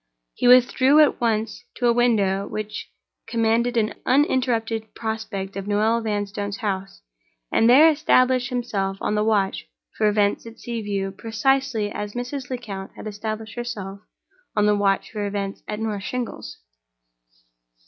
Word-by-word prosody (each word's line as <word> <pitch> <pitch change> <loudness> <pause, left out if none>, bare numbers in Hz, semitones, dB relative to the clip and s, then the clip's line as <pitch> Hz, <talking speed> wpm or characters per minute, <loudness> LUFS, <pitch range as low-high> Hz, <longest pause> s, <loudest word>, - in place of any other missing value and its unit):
He - - 0
withdrew 255 +3 +6
at 300 -4 +4
once 225 0 -1
to 245 - -2
a 235 - +5
window 205 -5 +2
which 215 0 -5 0.4
commanded 235 +1 +1
an 215 -1 +1
uninterrupted 235 -5 +1
prospect 220 -3 -4
of 195 0 -5
Noel 215 +3 +2
Vanstone's 205 -2 -3
house, 195 - -4 0.5
and 225 - +4
there 285 +6 +8
established 255 -5 +3
himself 200 -6 -2
on - - -1
the 210 0 +1
watch 205 -3 0 0.3
for 215 - +2
events 205 +1 +1
at 230 - -12
Sea 235 -1 -4
View, 200 -2 -2
precisely 225 +1 0
as 210 0 -5
Mrs. 250 +2 -5
Lecount 210 -7 -6
had - - -10
established 215 +1 -5
herself 200 -5 -5 0.6
on 210 -1 +3
the 210 0 +4
watch 200 -1 +1
for 210 -2 -3
events 200 -1 -4
at 210 - -4
North 215 -3 -2
Shingles. 230 - -5
220 Hz, 145 wpm, -23 LUFS, 205-245 Hz, 0.6 s, there